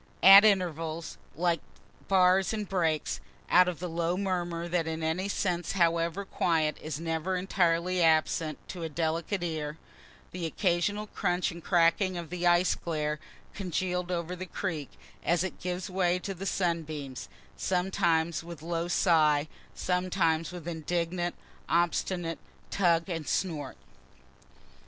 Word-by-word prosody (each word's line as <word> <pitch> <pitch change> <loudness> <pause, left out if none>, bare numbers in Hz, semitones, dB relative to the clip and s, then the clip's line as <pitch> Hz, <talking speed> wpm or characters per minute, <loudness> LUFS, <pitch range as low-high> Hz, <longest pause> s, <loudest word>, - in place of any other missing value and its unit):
At 195 +2 +11
intervals, 165 -5 0 0.2
like 170 0 +1 0.5
bars 190 +1 +4
and 210 -2 -3
breaks 165 -5 0 0.3
(out 180 0 +7
of 180 -3 -2
the 180 - -4
low 170 +1 -1
murmur 175 -3 -2
that 170 -2 0
in 160 0 -3
any 175 +5 -1
scene, 180 -3 0
however 170 +1 +1
quiet, 160 -5 0
is 155 -1 -4
never 165 +3 -2
entirely 180 -1 +1
absent 160 -1 +2
to 180 - -6
a 165 - -3
delicate 165 +4 -1
ear,) 155 -2 -3 0.5
the 175 -2 -3
occasional 190 +4 0
crunch 180 -2 -1
and 170 -1 -10
cracking 175 +1 +3
of 170 -2 -7
the 175 0 0
ice 175 +1 +4
glare 150 -2 -2 0.3
congeal'd 180 -1 -2
over 175 0 -2
the 185 +1 -7
creek, 165 -7 -4 0.3
as 175 0 +2
it 185 - -5
gives 180 +1 -3
way 180 -2 +1
to 195 +2 -5
the 195 +2 -6
sunbeams 155 -8 -2 0.3
sometimes 175 -3 +1
with 170 -2 -9
low 170 0 -2
sigh 155 -4 +3 0.3
sometimes 180 -3 0
with 175 -2 -8
indignant, 175 +1 -2 0.3
obstinate 170 0 0 0.3
tug 170 -3 +2
and 165 -5 -4
snort. 150 -8 -2
175 Hz, 135 wpm, -29 LUFS, 165-185 Hz, 0.5 s, At